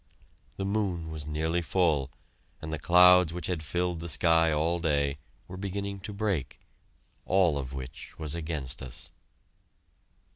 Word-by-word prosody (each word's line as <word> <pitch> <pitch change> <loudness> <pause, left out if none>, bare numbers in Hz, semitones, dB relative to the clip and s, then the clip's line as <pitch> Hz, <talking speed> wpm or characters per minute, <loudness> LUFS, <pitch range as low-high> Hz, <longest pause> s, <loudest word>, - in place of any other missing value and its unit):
The 95 - -2
moon 95 -6 -1
was 75 -2 -6
nearly 80 +3 0
full 80 -6 +1 0.5
and 80 0 -6
the 80 - -3
clouds 90 +1 +6
which 90 +1 -4
had 90 -4 -2
filled 90 +2 -2
the 85 +1 -5
sky 80 -1 +4
all 80 +3 +1
day, 70 -3 0 0.3
were 90 - -8
beginning 100 +1 -4
to 100 - -7
break, 100 -10 -2 0.7
all 90 -5 +3
of 70 -2 -4
which 65 -1 -8
was 75 -2 -4
against 80 -6 -3
us. 65 -2 -7
80 Hz, 145 wpm, -29 LUFS, 75-90 Hz, 0.7 s, clouds